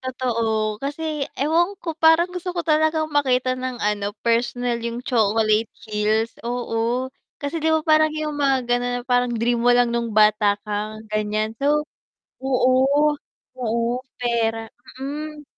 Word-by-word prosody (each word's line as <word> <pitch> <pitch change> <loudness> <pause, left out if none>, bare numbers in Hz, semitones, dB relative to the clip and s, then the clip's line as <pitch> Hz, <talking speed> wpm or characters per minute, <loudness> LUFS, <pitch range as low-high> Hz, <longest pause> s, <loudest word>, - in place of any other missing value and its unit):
totoo, 230 -4 -1
kasi 295 0 -3
ewan 335 +7 +1
ko 340 -2 -5
parang 325 +3 +4
gusto 360 0 -5
ko 340 - -1
talagang 315 0 +1
makita 255 -3 +2
ng 255 0 -4
ano, 205 0 -1
personal 235 0 0
yung 235 +2 -5
Chocolate 220 -1 +2 0.2
Hills, 215 +1 0
oo 240 +1 -2 0.2
kasi, 300 +3 -4
'di 320 - +1
ba, 315 0 +3
parang 310 -1 +4
yung 305 -1 -2
mga 275 -3 +1
ganun 245 0 0
na - - -10
parang 245 0 +2
dream 235 0 0
mo 240 - +2
lang 245 -1 +4
nung 235 0 -1
bata 210 -1 +4
ka 210 0 -3 0.2
ganyan, 215 +1 -1
so, 295 +2 +2 0.6
oo, 265 +3 +3 0.5
oo 235 +1 -1 0.2
pera, 225 -2 -1 0.3
mm, 300 +2 -6
245 Hz, 145 wpm, -22 LUFS, 225-295 Hz, 0.6 s, parang